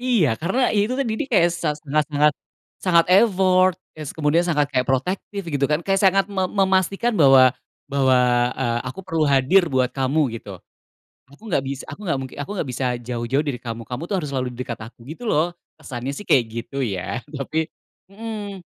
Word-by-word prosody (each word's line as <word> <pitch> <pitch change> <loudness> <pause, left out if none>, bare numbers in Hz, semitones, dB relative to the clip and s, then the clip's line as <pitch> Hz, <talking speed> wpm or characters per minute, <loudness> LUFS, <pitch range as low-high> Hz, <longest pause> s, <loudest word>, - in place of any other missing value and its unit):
Iya, 240 - +2
karena 190 +11 0 0.2
itu 210 +4 +2
tadi, 235 0 -1
kayak 175 -4 +5
sangat 160 -3 -2
sangat 150 +2 +1
sangat, 150 +1 +4 0.5
sangat 170 -2 +5
effort, 185 -4 +4 0.2
kes 155 -3 -6
kemudian 160 +3 +2
sangat 150 -5 +1
kayak 125 -2 +1
protektif 185 +8 -1
gitu 140 -2 0
kan, 150 - +2
kayak 195 -1 +1
sangat 195 0 +4
me 190 -2 -1
memastikan 195 +4 +1
bahwa 135 -4 +7 0.4
bahwa, 130 -2 +3 0.4
eee, 120 -2 -1
"aku 125 +9 -6
perlu 165 -4 0
hadir 140 +7 +4
buat 130 -1 +2
kamu" 135 +3 0 0.2
gitu. 100 -5 -10 0.7
"Aku 140 - -19
nggak 140 - +1
bis 135 0 -4
aku - - -9
nggak 165 -7 0
mungki 130 -1 -7
aku 145 - -6
nggak 145 - -2
bisa 125 +1 -2
jauh-jauh 120 +3 -1
dari 135 -4 -2
kamu, 115 -1 -5
kamu 125 +3 -5
tuh 200 - 0
harus 150 -4 -5
selalu 130 -1 -1
di 120 - -13
dekat 120 -3 -5
aku" - - -38
gitu 165 +11 -9
loh. 165 +4 +1 0.3
Kesannya 125 +1 -5
sih 205 +9 -7
kayak 125 -4 +4
gitu 115 +3 -6
ya, 105 +2 -3
tapi 155 +4 -2 0.4
hmm. 205 -2 -6
150 Hz, 185 wpm, -22 LUFS, 130-190 Hz, 0.7 s, bahwa